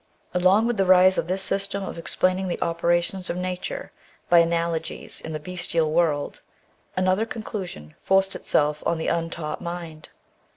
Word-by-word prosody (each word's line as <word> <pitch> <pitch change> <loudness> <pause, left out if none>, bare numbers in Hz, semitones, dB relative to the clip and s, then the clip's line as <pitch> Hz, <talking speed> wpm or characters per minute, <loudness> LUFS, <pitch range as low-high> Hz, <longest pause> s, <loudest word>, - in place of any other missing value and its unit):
Along 185 +5 +4
with 240 -1 0
the 195 -1 +2
rise 185 0 +6
of - - -2
this 190 +2 0
system 200 +1 0
of - - -5
explaining 185 +3 0
the 175 - -3
operations 175 +2 0
of 175 - -2
nature 180 0 -4 0.4
by 175 - +7
analogies 165 -1 -1
in 160 - -7
the 155 - -3
bestial 165 -1 -1
world, 155 -3 0 0.6
another 185 +4 +2
conclusion 190 - -6
forced 195 0 +2
itself 150 0 +1
on 170 - +1
the 160 - -1
untaught 165 -2 -3
mind. 170 -3 -7
175 Hz, 155 wpm, -24 LUFS, 165-190 Hz, 0.6 s, by